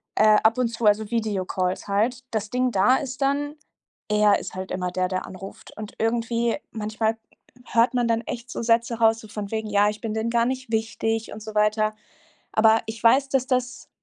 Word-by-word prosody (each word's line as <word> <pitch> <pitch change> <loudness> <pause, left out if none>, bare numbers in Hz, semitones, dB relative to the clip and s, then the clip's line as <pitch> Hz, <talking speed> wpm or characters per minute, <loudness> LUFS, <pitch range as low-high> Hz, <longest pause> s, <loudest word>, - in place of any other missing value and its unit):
Äh, 215 0 +6
ab 225 +2 +4
und 250 -1 +2
zu, 230 0 -4
also 210 0 +3
Videocalls 190 -5 -1
halt. 230 +6 0
Das 215 -2 -2
Ding 250 0 +1
da 220 +6 +4
ist 265 0 -6
dann: 285 +2 0 0.5
Er 210 -1 +4
ist - - -8
halt 185 0 -6
immer 180 -1 -2
der, 185 0 0
der 185 0 -2
anruft. 190 +1 -10
Und 215 -1 -7
irgendwie 230 +1 0
manchmal 220 +1 -2 0.5
hört 235 +2 +2
man 245 -1 +2
dann 230 0 +1
echt 235 +2 -7
so - - -4
Sätze 230 0 +1
raus, 225 0 +4
so 220 - -12
von 205 -2 -6
wegen: 220 -1 -3
„Ja, 205 0 +3
ich 210 0 -6
bin 225 -2 -3
denen 220 +1 -1
gar 235 0 +2
nicht 260 -1 -3
wichtig“ 225 0 -1
und 215 - -9
so 215 -1 -8
weiter. 215 0 +2 0.6
Aber 220 +1 +5
ich 220 0 -7
weiß, 265 +4 +4
dass 265 -2 +1
das 255 -1 -2
225 Hz, 200 wpm, -24 LUFS, 210-235 Hz, 0.6 s, Äh